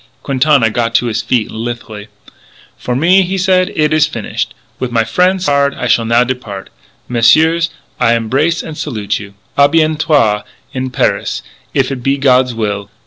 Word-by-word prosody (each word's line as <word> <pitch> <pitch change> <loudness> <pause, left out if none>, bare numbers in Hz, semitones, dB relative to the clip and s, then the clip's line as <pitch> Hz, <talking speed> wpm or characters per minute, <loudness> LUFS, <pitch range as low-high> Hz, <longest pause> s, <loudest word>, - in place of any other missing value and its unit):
Quintana 135 -4 +2
got 115 0 -1
to - - +3
his 115 -1 -1
feet 115 0 -1
lithely. 110 -2 -6 0.7
"For 125 - -4
me," 175 +8 +4
he 190 +1 -2
said, 185 0 +2
"it 155 0 +1
is 155 -1 +3
finish. 115 -8 -3 0.3
With 130 - -2
my 115 -1 +2
frien' 180 +12 +2
Sard 140 -5 +1
I - - -4
shall 115 -1 +2
now 115 +2 +3
depart. 115 -6 -6 0.4
Messieurs, 160 +8 +3 0.3
I 115 -1 +3
embrace 135 +9 0
and 160 - -7
salute 110 -10 -3
you. 100 -1 -11 0.2
A 140 0 +6
bientôt 155 -9 +2 0.3
in 130 -1 -3
Paris 125 - -1 0.3
if 135 0 +1
it 130 -2 -4
be 135 +3 0
God's 130 -3 +2
will! 100 -2 -3
130 Hz, 165 wpm, -14 LUFS, 115-155 Hz, 0.7 s, A